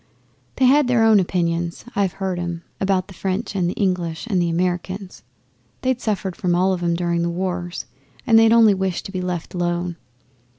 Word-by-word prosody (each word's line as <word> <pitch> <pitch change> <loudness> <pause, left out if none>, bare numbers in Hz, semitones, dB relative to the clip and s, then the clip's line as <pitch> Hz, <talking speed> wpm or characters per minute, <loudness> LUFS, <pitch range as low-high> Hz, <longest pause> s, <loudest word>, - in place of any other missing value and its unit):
'They 260 - +3
had 280 +1 +5
their 245 -2 +3
own 220 -2 +6
opinions 170 -1 -1
(I've 195 -3 +1
heard 190 -2 -3
'em) 170 -1 -4 0.2
about 190 -1 +1
the 200 - -12
French 190 +5 -3
and 180 -3 +1
the - - -4
English, 180 -4 -1
and 195 -6 +1
the 170 - +1
Americans. 180 +2 -2 0.6
They'd 255 -1 0
suffered 195 -4 -2
from 180 -5 0
all 185 +2 +3
of 180 - -3
'em 170 -1 +1
during 170 0 0
the 170 - 0
wars, 175 0 -3 0.4
and 225 -3 +6
they 225 0 +6
only 225 -2 +6
wished 190 -2 -2
to - - -6
be 185 -2 -3
left 180 -2 -4
alone. 175 -1 -2
185 Hz, 195 wpm, -21 LUFS, 175-200 Hz, 0.6 s, own